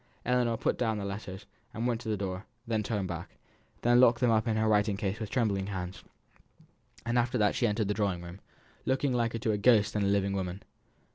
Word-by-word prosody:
Ellinor 125 -2 +2
put - - -1
down 110 -3 +1
the 100 - -4
letters, 95 -1 -6 0.3
and 115 - -2
went 120 -2 0
to 110 - -5
the 105 - 0
door, 95 0 -4 0.2
then 115 -2 0
turned 105 -3 -2
back, 85 -1 -7 0.5
and 120 +1 +5
locked 120 -2 +5
them 125 -2 +3
up 110 +1 +2
in 110 -1 +1
her 110 0 +2
writing 105 -1 +2
case 100 +1 -2
with 110 -3 -4
trembling 100 -6 0
hands; 95 -1 -5 1.0
and 120 +1 +2
after 120 +1 0
that 105 -2 +3
she 120 - +1
entered 105 -1 0
the 105 - +1
drawing 100 -4 -1
room, 85 +2 -9 0.4
looking 130 0 +1
liker 115 -1 0
to 110 0 0
a 105 - -1
ghost 105 -2 +4
than 105 - 0
to 100 - +2
a - - +2
living 100 -1 +1
woman. 95 0 -3
105 Hz, 225 wpm, -30 LUFS, 100-115 Hz, 1.0 s, and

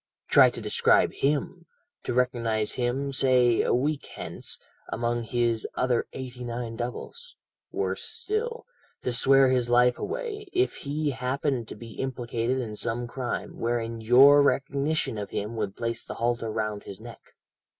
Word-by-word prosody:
"Try - - +7
to - - -7
describe - - +3
him, 150 +5 -1 0.4
to - - -1
recognize 115 -4 +1
him, 130 +3 -1
say 125 -3 +4
a - - 0
week 145 +4 0
hence, - - -6 0.3
among 120 +1 -1
his 115 -1 0
other 125 -2 +1
eighty 125 -1 -7
nine 120 -1 -4
doubles; 125 - -6 0.4
worse - - -2
still, 465 +1 -3 0.4
to 125 - 0
swear 135 +2 +5
his 125 -2 +1
life 125 0 +4
away, 435 -2 -4
if 375 +1 +1
he 145 +1 -2
happened 125 0 -2
to - - -8
be 115 +1 -11
implicated 125 -1 -2
in 115 -5 -4
some 120 +2 -2
crime, 125 +1 -4
wherein 115 -1 -2
your 135 +6 +7
recognition 140 -3 0
of 100 - -5
him 105 +3 -4
would 100 -3 -3
place 115 0 -3
the - - -7
halter 115 -1 -1
round 105 -1 -2
his 100 - -10
neck. - - -13
125 Hz, 150 wpm, -27 LUFS, 115-140 Hz, 0.4 s, Try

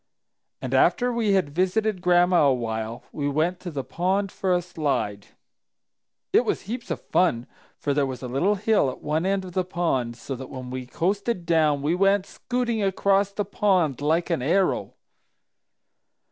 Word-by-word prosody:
"And - - -3
after 245 0 +3
we 225 -4 +1
had 180 -7 +1
visited 190 +3 0
Gran'ma 175 -3 +4
a - - +4
while, 115 0 -4
we 145 -2 -2
went 160 +5 0
to 180 - -6
the 140 -5 -4
pond 190 +6 -1
for 190 - -2
a 180 - +4
slide. 140 - -2 1.1
"It - - +5
was - - -1
heaps 235 +4 -6
of - - -2
fun, 125 -10 +1 0.3
for 145 - -1
there 140 -1 +1
was 130 -2 -6
a - - -3
little 170 +12 +1
hill 210 -7 +2
at 130 - -9
one 155 +4 0
end 195 -1 0
of 180 - -8
the 185 - +1
pond 160 -10 -1
so 135 +3 -6
that 130 +1 -8
when 130 -2 -7
we 130 -1 -5
coasted 195 - -1
down, 155 -4 +2
we 155 +3 +1
went 195 +1 +3
scooting 240 0 -2
across 195 0 +2
the 205 0 -2
pond 185 - +1
like 165 +4 +1
an 165 - 0
arrow. 180 +8 +1
175 Hz, 175 wpm, -25 LUFS, 140-195 Hz, 1.1 s, It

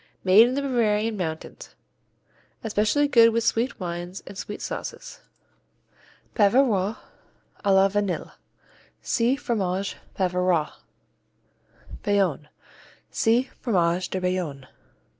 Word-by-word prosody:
Made 200 +5 +7
in 255 - -2
the 280 - -1
Bavarian 225 -4 +1
mountains. 160 -5 -6 0.9
Especially 220 +6 +1
good 230 -4 +6
with 230 0 0
sweet 230 +4 0
wines 175 +1 -5
and - - -10
sweet 210 +2 -6
sauces. - - -6 1.1
Bavarois 210 -2 +3 0.7
à - - -14
la 190 0 +5
Vanille 200 -1 -2 0.7
see 240 +3 +1
Fromage 200 -8 -2 0.2
Bavarois. 180 -4 +1 1.3
Bayonne 185 -8 0 0.6
see 240 +4 +1
Fromage 180 -5 +1
de 190 - -2
Bayonne. 180 -7 -2
200 Hz, 100 wpm, -25 LUFS, 180-230 Hz, 1.3 s, Made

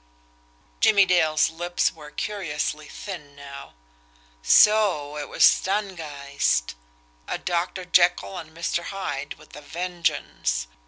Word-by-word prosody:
Jimmie 200 -2 +5
Dale's 160 -4 +3
lips 175 +2 -1
were 150 -2 -12
curiously 150 -5 -3
thin 150 -8 -8
now. 140 - -11 0.7
So 185 - +4
it 145 - -6
was - - +1
Stangeist! 150 - 0 0.5
A - - -2
Doctor 180 +1 -2
Jekyll 180 +1 +2
and 160 -2 -10
Mr. 170 +1 -3
Hyde 145 -8 -4
with - - -17
a 150 - -9
vengeance! 145 - -2
165 Hz, 110 wpm, -24 LUFS, 145-180 Hz, 0.7 s, Jimmie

